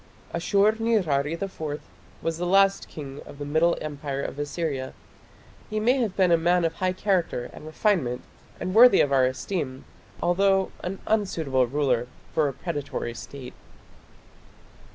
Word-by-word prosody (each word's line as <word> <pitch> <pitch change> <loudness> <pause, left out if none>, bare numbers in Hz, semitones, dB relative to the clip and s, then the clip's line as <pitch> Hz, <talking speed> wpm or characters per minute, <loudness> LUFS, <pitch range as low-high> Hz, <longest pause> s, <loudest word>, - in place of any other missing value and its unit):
Ashur 200 +5 +3
nirari 165 -11 +1
IV 160 -5 -4 0.4
was 165 0 -2
the 175 - -1
last 195 +1 +4
king 140 -2 -8
of - - -11
the 145 - -5
Middle 160 +4 +2
Empire 145 -2 -4
of 145 - -5
Assyria. 145 -3 -3 0.7
He 215 - -1
may 245 +5 +3
have 220 -6 -1
been 185 -3 +4
a 170 - +6
man 175 +1 +3
of 165 - 0
high 185 0 -1
character 185 -10 -1
and 155 - -10
refinement 155 - 0 0.4
and 185 - -3
worthy 235 -1 +8
of 145 - +1
our 130 -2 +4
esteem, 130 - -4 0.3
although 195 +2 +2
an 190 +2 -4
unsuitable 160 - +1
ruler 125 -3 +1 0.3
for 155 -2 +3
a 140 - -3
predatory 145 -7 -4
State. 130 +2 -9
165 Hz, 150 wpm, -26 LUFS, 140-195 Hz, 0.7 s, worthy